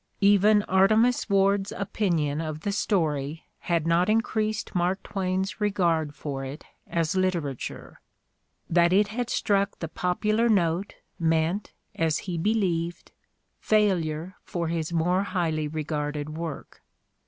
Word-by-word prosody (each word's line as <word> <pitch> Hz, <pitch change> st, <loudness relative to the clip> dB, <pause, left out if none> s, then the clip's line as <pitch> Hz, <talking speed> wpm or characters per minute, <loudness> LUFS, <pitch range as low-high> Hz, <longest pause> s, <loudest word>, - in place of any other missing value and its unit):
Even 205 Hz, +1 st, +5 dB
Artemus 215 Hz, +6 st, +3 dB
"Ward's 195 Hz, 0 st, +2 dB
opinion 165 Hz, -7 st, -1 dB
of 155 Hz, -1 st, -5 dB
the 200 Hz, -, -1 dB
story 160 Hz, -7 st, -1 dB, 0.2 s
had 170 Hz, -3 st, 0 dB
not 170 Hz, +3 st, +2 dB
increased 215 Hz, -1 st, 0 dB
Mark 180 Hz, +2 st, 0 dB
Twain's 190 Hz, +1 st, -2 dB
regard 170 Hz, -7 st, +1 dB
for 140 Hz, -2 st, -5 dB
it 135 Hz, +3 st, -7 dB, 0.2 s
as 165 Hz, -2 st, 0 dB
literature. 170 Hz, -8 st, -2 dB, 0.7 s
That 170 Hz, +1 st, +3 dB
it 205 Hz, +2 st, +4 dB
had 240 Hz, +2 st, -3 dB
struck 200 Hz, -3 st, +1 dB
the 165 Hz, -, -4 dB
popular 215 Hz, +8 st, 0 dB
note 180 Hz, -2 st, +1 dB, 0.2 s
meant, 165 Hz, +4 st, 0 dB, 0.2 s
as 160 Hz, -2 st, +1 dB
he 175 Hz, -3 st, -3 dB
believed, 175 Hz, -4 st, -1 dB, 0.5 s
failure 180 Hz, -5 st, +1 dB
for 170 Hz, -2 st, -3 dB
his 165 Hz, -1 st, -2 dB
more 175 Hz, +3 st, +2 dB
highly 165 Hz, -6 st, -1 dB
regarded 150 Hz, -1 st, -3 dB
work. 165 Hz, -2 st, -6 dB
175 Hz, 120 wpm, -26 LUFS, 160-200 Hz, 0.7 s, Even